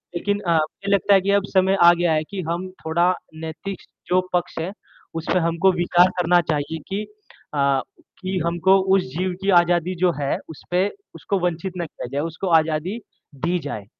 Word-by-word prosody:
लेकिन 205 +3 -1
अ, 170 -3 +1
मुझे 160 +6 -1
लगता 200 +1 +3
है 195 - +6
कि 200 +1 0
अब 200 -1 +3
समय 190 +1 +4
आ 175 0 +9
गया 175 -2 +1
है 155 0 +1
कि 195 -2 -4
हम 180 +2 -2 0.2
थोड़ा 170 +3 +2 0.2
नैतिक 160 +5 -6 0.3
जो 185 +1 +3
पक्ष 180 -1 -1
है, 175 +4 -3 0.4
उसपे 165 +3 0
हमको 170 +3 +2
विचार 175 +1 +4
करना 175 0 +4
चाहिए 150 +2 -2
कि 200 +2 -2 0.5
अ, 140 -1 +2 0.4
कि 185 0 -2
हमको 175 +3 +3 0.2
उस 190 - +3 0.2
जीव 185 0 -1
की 200 - -1
आज़ादी 175 +1 +1
जो 180 0 +2
है 140 - 0
उसपे 180 +5 -1 0.3
उसको 175 +5 -2
वंचित 180 +1 -2
ना 170 - -2
किया 150 - -8
जाए, 140 +1 -1
उसको 165 +4 -4
आज़ादी 160 +7 -2 0.4
दी 170 +6 -1
जाए, 125 -10 -6
175 Hz, 185 wpm, -22 LUFS, 160-190 Hz, 0.5 s, आ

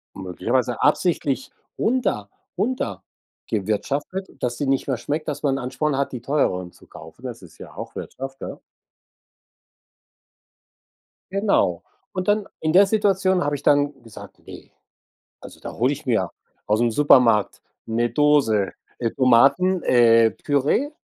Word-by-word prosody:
möglicherweise 120 +7 -2
absichtlich 145 -4 +1 0.3
runter 220 - 0 0.3
runtergewirtschaftet, 140 - -4
dass 120 -1 -2
sie 145 - -2
nicht 135 0 0
mehr 130 - 0
schmeckt, 150 +6 -4
dass 150 -1 -4
man 135 -2 +2
'n - - -4
Ansporn 140 +4 -2
hat, 140 +1 -1
die 125 -3 -6
teureren 90 -11 -1
zu - - -20
kaufen. 80 +8 -13
Das 120 -5 -7
ist 85 - -16
ja - - -11
auch - - -8
Wirtschaft, 135 0 -7
ja. - - -7 2.7
Genau. 195 - +1 0.3
Und 185 -1 -3
dann 205 0 +2
in 155 0 -1
der 195 +3 +7
Situation 195 -3 +2
habe 145 0 -1
ich 140 - -8
dann 145 -2 +2
gesagt: 115 -2 -13
„Ne, - - -12 0.7
also, - - -12
da - - -7
hole 125 +5 +1
ich 145 0 -8
mir 110 -7 +1 0.4
aus'm 115 +3 +2
Supermarkt 120 -6 +4 0.3
'ne 115 +1 0
Dose, 130 -7 +2 0.3
äh, 115 -2 -1
Tomaten 140 +10 +4
äh, 115 -2 +5
Püree, 145 - 0
135 Hz, 135 wpm, -22 LUFS, 115-155 Hz, 2.7 s, der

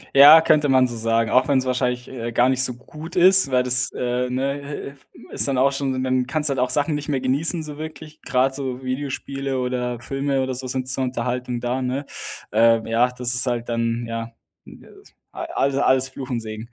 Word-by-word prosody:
Ja, 145 +4 +10
könnte 150 -2 +3
man 130 -1 +4
so 120 - -6
sagen, 115 0 0
auch 130 +2 +4
wenn's 130 -2 +2
wahrscheinlich, 125 -1 -1
äh, 120 -2 -5
gar 120 +2 +3
nicht 130 0 +1
so 125 -2 -2
gut 150 +6 -11
ist, 185 -3 +6
weil 125 -1 +2
das 125 0 +1
äh, 125 0 -2
ne 140 +2 -3
äh, 135 -3 -18
ist - - +2
dann 135 - 0
auch 135 +2 +3
schon 135 -2 -2
dann 130 -1 0
kannst 150 +1 -1
du - - 0
halt 135 - -1
auch 125 - +1
Sachen 145 +2 +1
nicht 145 0 -4
mehr 135 - 0
genießen 145 +6 0
so 150 -1 -9
wirklich, 155 0 -9
gerade 130 +1 +1
so 130 -2 -5
Videospiele 135 +1 -4
oder 125 -1 -2
Filme 135 +1 -1
oder 130 0 -3
so 130 +1 -4
sind 130 0 -3
zur 130 0 0
Unterhaltung 125 0 -3
da, 125 +2 -2
ne? 130 +3 -2 0.5
Äh, 115 +1 +3
ja, 120 +2 +2
das 125 -1 -2
ist 120 +2 0
halt 120 -1 -2
dann 115 0 -1
ja, 115 0 -5 0.4
äh, - - -11 0.6
alle 140 0 -1
alles 130 0 +2
Fluch 130 -1 -8
und 120 -3 -2
Segen. 110 +1 -8
130 Hz, 210 wpm, -22 LUFS, 125-140 Hz, 0.6 s, Ja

